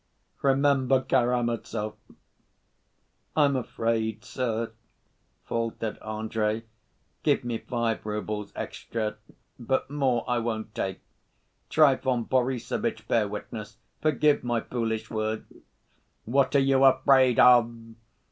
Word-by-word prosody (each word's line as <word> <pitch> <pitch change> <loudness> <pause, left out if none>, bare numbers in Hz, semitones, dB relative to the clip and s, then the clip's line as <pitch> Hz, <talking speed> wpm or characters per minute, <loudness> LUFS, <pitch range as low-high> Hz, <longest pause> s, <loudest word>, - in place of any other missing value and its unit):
Remember 135 -1 +3
Karamazov!" 120 -4 0 1.4
"I'm 145 -3 +4
afraid, 115 -2 -2
sir," 115 -3 -2 0.7
faltered 115 -1 -3
Andrey. 110 0 -2 0.6
"Give 145 -3 +2
me 120 -2 -3
five 120 -2 -2
roubles 105 0 -4
extra, 110 -2 -4 0.4
but 130 +3 -1
more 130 -5 0
I 120 -1 +1
won't 110 -2 -3
take. 95 -3 -3 0.7
Trifon 130 -5 +3
Borissovitch, 125 -1 -1
bear 110 -3 +2
witness. 105 +1 -7 0.2
Forgive 150 -1 +2
my 120 -2 0
foolish 115 -2 -3
words 110 -1 -3 0.4
..." - - -42
"What 135 +4 +2
are - - +7
you 135 0 +3
afraid 130 -2 +5
of?" 120 -2 +7
120 Hz, 100 wpm, -27 LUFS, 110-130 Hz, 1.4 s, are